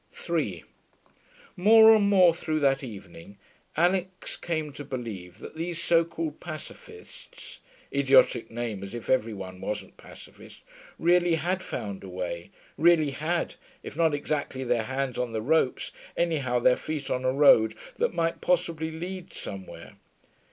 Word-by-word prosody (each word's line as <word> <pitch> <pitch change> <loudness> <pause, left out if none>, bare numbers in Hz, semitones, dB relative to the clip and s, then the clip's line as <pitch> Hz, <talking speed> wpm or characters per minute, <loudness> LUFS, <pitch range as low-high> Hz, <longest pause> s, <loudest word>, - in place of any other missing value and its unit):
3 140 - -2 0.9
More 220 +4 +8
and 205 -2 +3
more 185 -4 +6
through 155 -2 -2
that 135 -1 +2
evening 100 -4 -10 0.4
Alix 180 +2 0
came 155 -4 -3
to 145 - -8
believe 115 -10 -7
that - - -10
these 170 +1 -4
so 170 -1 +3
called 165 -2 -5
Pacificists 155 -3 -11 0.3
(idiotic 135 -4 +4
name 115 -4 -4
as 100 +4 -7
if 120 - -4
every 115 -4 +1
one 95 -1 -8
wasn't 105 - -5
Pacificist) - - -14 0.4
really 175 0 +3
had 180 +4 -1
found 100 - -6
a 95 - -8
way, 85 -2 -5 0.3
really 160 -3 +4
had, 160 +5 -2 0.3
if - - -8
not 160 -2 +2
exactly 145 -2 -3
their 120 -3 0
hands 130 -1 -3
on 125 -2 -2
the 110 - -2
ropes, 155 -1 +1 0.3
anyhow 150 -8 +1
their 125 +1 +4
feet 155 -3 -5
on 125 0 -1
a 130 - +2
road 115 -6 +5 0.2
that - - +1
might 165 -1 -1
possibly 170 -3 0
lead 180 +3 -7
somewhere. 95 -1 -8
145 Hz, 145 wpm, -27 LUFS, 115-170 Hz, 0.9 s, More